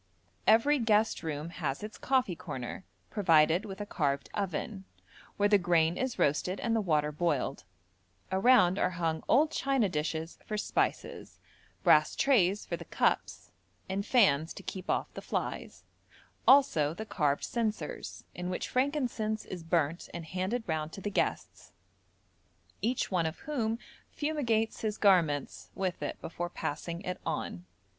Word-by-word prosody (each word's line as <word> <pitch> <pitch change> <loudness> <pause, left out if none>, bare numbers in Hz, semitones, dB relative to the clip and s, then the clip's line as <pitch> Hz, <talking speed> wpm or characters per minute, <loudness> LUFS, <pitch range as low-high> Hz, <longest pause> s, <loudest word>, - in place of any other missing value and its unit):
Every 270 +7 +5
guest 220 -1 +2
room 155 0 -4
has 145 -2 -3
its 215 +1 -7
coffee 255 -9 +1
corner, 130 +4 -6 0.3
provided 170 -1 +4
with 195 -1 -7
a 205 - -3
carved 140 -7 -1
oven, 195 +1 -3 0.5
where 205 - +4
the 205 -1 +5
grain 170 -2 +3
is 260 -1 -2
roasted 165 +6 +1
and 230 -1 0
the 225 - +2
water 150 -5 +1
boiled; 150 - -1 0.7
around 190 -2 +5
are - - +2
hung 165 -2 -1
old 300 +5 +4
china 270 -5 +1
dishes 160 +1 -3
for 215 - -4
spices, - - -2 0.5
brass - - +5
trays 210 -8 +3
for - - -3
the - - -10
cups, - - -1 0.4
and 195 +1 -2
fans 165 - +3
to - - -9
keep 185 -2 -7
off - - -1
the - - -7
flies; - - -4 0.6
also 165 - +5
the 220 - -5
carved 145 -8 0
censers, 220 -3 -3
in 180 0 -4
which 180 - -3
frankincense 250 -6 0
is 180 - -7
burnt 165 0 0
and 170 -2 -5
handed 190 +8 -2
round 155 -1 -2
to 195 - -7
the 205 - -3
guests, - - -2 1.1
each 235 +3 0
one 170 -3 +2
of 160 - -6
whom 230 -7 -1 0.3
fumigates 245 -8 -1
his 215 -1 -2
garments 165 -8 +2
with 185 -2 -2
it - - -4
before 175 +1 -4
passing 170 +1 -4
it 180 -1 -4
on. 90 +1 -4
190 Hz, 150 wpm, -30 LUFS, 160-220 Hz, 1.1 s, Every